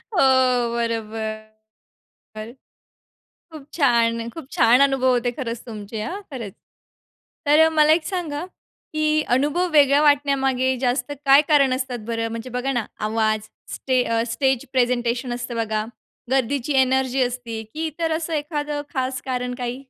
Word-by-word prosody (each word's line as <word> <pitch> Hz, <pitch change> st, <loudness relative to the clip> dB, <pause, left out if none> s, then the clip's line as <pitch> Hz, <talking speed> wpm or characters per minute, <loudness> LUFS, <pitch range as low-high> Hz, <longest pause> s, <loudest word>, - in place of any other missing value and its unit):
हो 345 Hz, -, +4 dB, 0.5 s
बरोबर. 225 Hz, -2 st, -2 dB, 1.1 s
बर. 215 Hz, +2 st, -7 dB, 1.0 s
खूप 300 Hz, -3 st, -11 dB
छान! 230 Hz, -5 st, +2 dB
खूप 270 Hz, +2 st, -10 dB
छान 245 Hz, +3 st, +5 dB
अनुभव 265 Hz, -1 st, +1 dB
होते 245 Hz, 0 st, 0 dB
खरंच 235 Hz, -4 st, -4 dB
तुमचे 215 Hz, -1 st, -7 dB
हां, 390 Hz, -, -5 dB
खरंच! 225 Hz, -7 st, -6 dB, 0.9 s
तर 295 Hz, +2 st, +5 dB
अ, 320 Hz, -, +6 dB
मला 305 Hz, 0 st, +6 dB
एक 325 Hz, -, -12 dB
सांगा, 335 Hz, -5 st, -3 dB, 0.5 s
की 310 Hz, 0 st, 0 dB, 0.3 s
अनुभव 300 Hz, +7 st, +1 dB
वेगळ्या 285 Hz, 0 st, +5 dB
वाटण्यामागे 270 Hz, -3 st, +2 dB
जास्त 250 Hz, +1 st, 0 dB
काय 275 Hz, +2 st, +7 dB
कारण 275 Hz, -3 st, +5 dB
असतात 255 Hz, -2 st, -3 dB
बरं? 230 Hz, 0 st, -1 dB
म्हणजे 230 Hz, +2 st, -7 dB
बघा 270 Hz, +2 st, -1 dB
ना, 240 Hz, -4 st, -1 dB, 0.2 s
आवाज, 215 Hz, -1 st, 0 dB, 0.3 s
स्टे 255 Hz, -2 st, +1 dB
अ, 230 Hz, -1 st, 0 dB
स्टेज 265 Hz, -1 st, 0 dB
प्रेझेंटेशन 245 Hz, -1 st, 0 dB
असतं 240 Hz, 0 st, -5 dB
बघा, 215 Hz, -1 st, -2 dB, 0.5 s
गर्दीची 270 Hz, +2 st, 0 dB
एनर्जी 260 Hz, 0 st, +1 dB
असती, 245 Hz, -2 st, -4 dB
की 320 Hz, +1 st, -3 dB
इतर 325 Hz, +1 st, -3 dB
असं 330 Hz, 0 st, -5 dB
एखाद 295 Hz, -1 st, -3 dB, 0.2 s
खास 260 Hz, -1 st, -2 dB
कारण 250 Hz, -1 st, -2 dB
काही? 245 Hz, 0 st, -2 dB
255 Hz, 140 wpm, -22 LUFS, 235-285 Hz, 1.1 s, काय